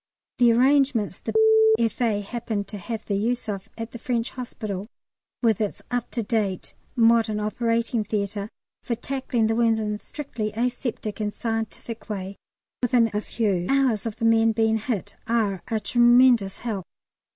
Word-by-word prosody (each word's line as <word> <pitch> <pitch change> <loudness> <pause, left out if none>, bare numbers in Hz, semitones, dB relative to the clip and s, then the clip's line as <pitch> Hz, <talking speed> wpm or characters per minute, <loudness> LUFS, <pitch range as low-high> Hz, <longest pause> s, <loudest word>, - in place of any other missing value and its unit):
The 240 -1 +6
arrangements 260 -2 +3
the - - -5 0.4
F.A. 225 -2 0
happen 220 -1 -3
to 205 +1 -8
have 225 +3 -5
the 205 - -2
use 235 +4 -1
of 200 -3 -5
at 225 0 -5
the 235 - -8
French 235 0 -1
Hospital, 215 -6 -5 0.6
with 225 -3 +3
its 210 - -3
up 245 0 -1
to 235 - -3
date 200 -4 -2 0.2
modern 225 -2 +4
operating 230 +2 0
theatre 205 0 -3 0.3
for 235 - -2
tackling 260 -2 -1
the 220 - +2
wounds 225 -1 +2
in 210 -1 -1
a 210 - -5
strictly 235 -8 -5
aseptic 235 -2 -3
and 210 -1 -1
scientific 225 +1 -4
way 195 -1 -4 0.5
within 240 -2 +3
a 210 - 0
few 200 -6 -1
hours 255 -6 +2
of 220 - -4
the 230 0 -2
men 225 0 +4
being 220 0 +2
hit, 205 -3 -3
are 215 -5 +1
a 220 - 0
tremendous 240 -2 +4
help. 210 -6 -4
225 Hz, 160 wpm, -25 LUFS, 210-240 Hz, 0.6 s, The